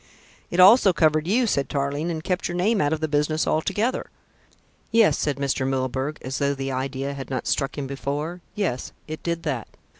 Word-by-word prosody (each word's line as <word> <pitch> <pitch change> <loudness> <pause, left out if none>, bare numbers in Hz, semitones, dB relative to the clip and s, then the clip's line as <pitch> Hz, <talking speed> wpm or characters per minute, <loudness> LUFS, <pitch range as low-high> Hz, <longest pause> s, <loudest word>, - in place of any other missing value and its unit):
"It 175 - -2
also 195 +1 +8
covered 155 -1 +2
you," 240 +6 +3
said 140 -11 0
Tarling, 140 +3 -1
"and 160 -2 -3
kept 180 0 -1
your 175 - -4
name 200 +3 +2
out 145 - +1
of 160 -1 -1
the 155 - +1
business 150 +1 +1
altogether." 205 +10 0 0.8
"Yes," 225 -1 +5
said 145 -2 -1
Mr. 140 -1 -1
Milburgh, 130 +2 -1
as 130 0 -3
though 140 0 +1
the 135 0 -3
idea 135 +1 -3
had 135 -1 -7
not 130 -3 -3
struck 135 0 -1
him 145 - -2
before, 145 +5 -4
"yes, 170 -12 -2
it 155 0 -6
did 170 -1 -2
that. 135 -8 -2
150 Hz, 190 wpm, -24 LUFS, 135-175 Hz, 0.8 s, also